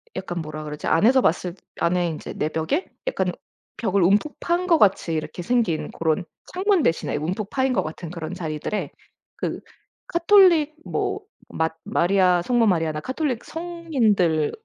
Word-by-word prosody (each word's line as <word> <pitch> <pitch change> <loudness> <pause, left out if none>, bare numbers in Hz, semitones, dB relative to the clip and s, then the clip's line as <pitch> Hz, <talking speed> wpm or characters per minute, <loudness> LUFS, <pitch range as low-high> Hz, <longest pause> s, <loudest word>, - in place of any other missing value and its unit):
약간 175 -2 -4
뭐라 155 0 -6
그러지? 150 0 -6
안에서 250 +10 +4
봤을 180 -2 0 0.2
안에 175 +1 +1
인제 155 - -6
내벽에 160 - -1 0.2
약간 - - 0 0.5
벽을 200 -4 +1
움푹 205 - +2
판 345 +1 0
것 335 -3 +4
같이 195 -4 +3
이렇게 160 +3 -4
생긴 225 -7 0
고런 165 +2 -1 0.3
창문 380 -2 +2
대신에 165 - 0
움푹 185 +7 -3
파인 265 -1 +1
것 - - +1
같은 160 +2 -7
그런 165 -2 -6
자리들에 155 +5 -3 0.5
그 - - -3 0.5
가톨릭 340 -4 +5
뭐 405 - -2 0.3
마 160 0 0 0.2
마리아 180 0 +3
성모 240 +5 +2
마리아나 165 -6 +1
가톨릭 260 - -3
성인들을 250 - 0
190 Hz, 310 characters per minute, -23 LUFS, -, 0.5 s, 가톨릭